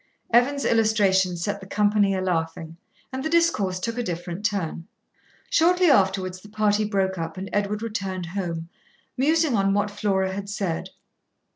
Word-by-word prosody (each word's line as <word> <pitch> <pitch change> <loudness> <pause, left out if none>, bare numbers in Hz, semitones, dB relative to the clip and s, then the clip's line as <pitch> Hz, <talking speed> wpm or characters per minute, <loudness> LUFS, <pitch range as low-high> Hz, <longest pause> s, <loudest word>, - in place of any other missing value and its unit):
Evan's 275 +4 +3
illustration 200 -5 +3
set 200 +4 -2
the 190 - -11
company 205 -1 +2
a 185 - -1
laughing, 165 -2 -2 0.4
and 260 0 -3
the 315 - -1
discourse 265 - +2
took 230 +5 -3
a - - +1
different 175 0 -5
turn. 190 -5 -2 0.6
Shortly 355 0 +4
afterwards 190 -3 +1
the 210 - -14
party 215 0 +1
broke 190 -3 0
up, 165 +2 -5
and 195 +1 -6
Edward 205 +1 -1
returned 190 -5 -3
home, 170 -2 -4 0.5
musing 310 0 +2
on 195 -1 +2
what 205 0 0
Flora 190 -2 0
had 200 +1 -5
said. 195 -5 -3
200 Hz, 155 wpm, -24 LUFS, 185-215 Hz, 0.6 s, Shortly